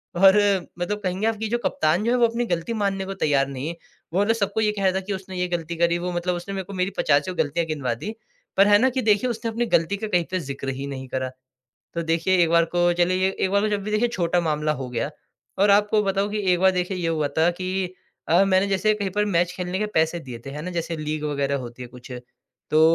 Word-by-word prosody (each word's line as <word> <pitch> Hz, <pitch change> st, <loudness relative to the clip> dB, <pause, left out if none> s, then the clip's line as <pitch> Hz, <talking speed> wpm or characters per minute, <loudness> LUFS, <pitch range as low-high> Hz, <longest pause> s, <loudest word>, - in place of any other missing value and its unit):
और 190 Hz, +2 st, +7 dB, 0.4 s
मतलब 205 Hz, +4 st, -2 dB
कहेंगे 190 Hz, +4 st, 0 dB
आप 225 Hz, -, +1 dB
कि 220 Hz, +1 st, -3 dB
जो 240 Hz, -, +1 dB
कप्तान 155 Hz, +6 st, +1 dB
जो 235 Hz, -, +1 dB
है 250 Hz, -, +3 dB
वो 235 Hz, -1 st, +5 dB
अपनी 235 Hz, +1 st, -2 dB
गलती 175 Hz, +3 st, -2 dB
मानने 200 Hz, -3 st, -1 dB
को 195 Hz, -, -4 dB
तैयार 145 Hz, -7 st, +1 dB
नहीं 135 Hz, +1 st, -5 dB
है। 170 Hz, -, -4 dB, 0.4 s
वो 195 Hz, -, +3 dB
ना 225 Hz, -, +3 dB
सबको 200 Hz, -1 st, -1 dB
ये 210 Hz, -1 st, +2 dB
कह 200 Hz, -2 st, -4 dB
रहा 190 Hz, -, +3 dB
था 190 Hz, -, 0 dB
कि 200 Hz, -, -2 dB
उसने 190 Hz, -1 st, -7 dB
ये 180 Hz, 0 st, 0 dB
गलती 170 Hz, -1 st, -3 dB
करी। 170 Hz, 0 st, +2 dB
वो 180 Hz, +1 st, -3 dB
मतलब 175 Hz, +1 st, -1 dB
उसने 175 Hz, +3 st, -6 dB
मेरे 190 Hz, -, -3 dB
को 200 Hz, -, -9 dB
मेरी 185 Hz, +1 st, -1 dB
पचासियों 150 Hz, +5 st, +1 dB
गलतियाँ 165 Hz, +3 st, 0 dB
गिनवा 140 Hz, -6 st, -1 dB
दी, 155 Hz, -, -5 dB, 0.5 s
पर 195 Hz, -, +6 dB
है 205 Hz, 0 st, +7 dB
ना 260 Hz, +3 st, +4 dB
कि 260 Hz, +1 st, -1 dB
देखिए 215 Hz, +3 st, +2 dB
उसने 230 Hz, 0 st, -3 dB
अपनी 240 Hz, +2 st, -1 dB
गलती 165 Hz, +5 st, +1 dB
का 220 Hz, +1 st, -4 dB
कहीं 180 Hz, -4 st, +1 dB
पे 185 Hz, -, 0 dB
ज़िक्र 140 Hz, -2 st, -5 dB
ही 140 Hz, -, -4 dB
नहीं 130 Hz, -1 st, -6 dB
करा। 130 Hz, 0 st, -2 dB, 0.7 s
तो 170 Hz, -, -1 dB
देखिए 165 Hz, +3 st, +1 dB
एक 165 Hz, -, +2 dB
बार 170 Hz, 0 st, +5 dB
को 175 Hz, 0 st, +4 dB
चलिए 185 Hz, +1 st, +2 dB
एक 190 Hz, -1 st, -1 dB
बार 200 Hz, +1 st, +3 dB
को 215 Hz, -, +1 dB
जब 205 Hz, -1 st, -1 dB
भी 210 Hz, -, -3 dB
देखिए 220 Hz, +3 st, +2 dB
छोटा 175 Hz, -5 st, 0 dB
मामला 150 Hz, -2 st, 0 dB
हो 125 Hz, -, -5 dB
गया। 120 Hz, -, -2 dB, 0.5 s
और 200 Hz, +1 st, +4 dB
आपको 210 Hz, +1 st, +4 dB
बताऊँ 195 Hz, +1 st, 0 dB
कि 210 Hz, -, -1 dB
एक 175 Hz, -, +1 dB
बार 190 Hz, 0 st, +6 dB
देखिए 180 Hz, +1 st, -1 dB
ये 170 Hz, -2 st, -1 dB
हुआ 155 Hz, -3 st, 0 dB
था 165 Hz, +2 st, +4 dB
कि 185 Hz, 0 st, -2 dB, 0.3 s
अ, 175 Hz, +4 st, +5 dB
मैंने 190 Hz, 0 st, +3 dB
जैसे 195 Hz, +2 st, +2 dB
कहीं 200 Hz, -2 st, -3 dB
पर 210 Hz, +2 st, +1 dB
मैच 180 Hz, -3 st, +1 dB
खेलने 180 Hz, 0 st, -3 dB
के 210 Hz, -, 0 dB
पैसे 160 Hz, +2 st, +2 dB
दिए 125 Hz, -4 st, -8 dB
थे -, -, -5 dB
है 145 Hz, +2 st, -6 dB
ना 180 Hz, -, -4 dB
जैसे 170 Hz, -1 st, -3 dB
लीग 155 Hz, 0 st, -3 dB
वगैरह 140 Hz, -1 st, 0 dB
होती 120 Hz, 0 st, -8 dB
है 120 Hz, -, -8 dB
कुछ। 125 Hz, +1 st, -13 dB, 0.6 s
तो 155 Hz, -, +4 dB
180 Hz, 265 wpm, -24 LUFS, 160-200 Hz, 0.7 s, और